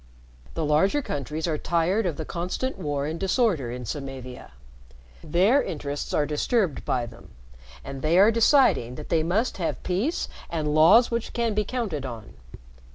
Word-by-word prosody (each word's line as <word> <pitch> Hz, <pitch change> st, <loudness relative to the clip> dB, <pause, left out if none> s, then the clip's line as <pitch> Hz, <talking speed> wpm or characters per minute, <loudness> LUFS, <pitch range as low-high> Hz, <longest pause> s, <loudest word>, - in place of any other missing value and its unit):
The 160 Hz, -, -1 dB
larger 190 Hz, -, +2 dB
countries 150 Hz, -, -4 dB
are 155 Hz, -3 st, -1 dB
tired 175 Hz, +5 st, +1 dB
of 160 Hz, -5 st, -3 dB
the 160 Hz, -, -4 dB
constant 180 Hz, +10 st, -3 dB
war 145 Hz, -2 st, -2 dB
and 160 Hz, +2 st, -4 dB
disorder 190 Hz, -, +1 dB
in 125 Hz, +1 st, -6 dB
Samavia. 130 Hz, -1 st, -7 dB, 0.7 s
Their 195 Hz, -, +3 dB
interests 145 Hz, -2 st, -4 dB
are 150 Hz, -, +1 dB
disturbed 155 Hz, -, 0 dB
by 125 Hz, -2 st, 0 dB
them, 115 Hz, 0 st, -13 dB, 0.5 s
and 135 Hz, -1 st, -7 dB
they 155 Hz, +4 st, +2 dB
are 205 Hz, +4 st, +7 dB
deciding 230 Hz, -, +3 dB
that 150 Hz, -, -9 dB
they 165 Hz, -2 st, +2 dB
must 190 Hz, +10 st, 0 dB
have 170 Hz, -4 st, -3 dB
peace 210 Hz, -, -1 dB, 0.2 s
and 155 Hz, -3 st, -2 dB
laws 165 Hz, +12 st, +6 dB
which 235 Hz, -1 st, -3 dB
can 235 Hz, -2 st, 0 dB
be 210 Hz, +1 st, +1 dB
counted 205 Hz, -, -3 dB
on. 115 Hz, -5 st, -8 dB
165 Hz, 160 wpm, -25 LUFS, 145-210 Hz, 0.7 s, are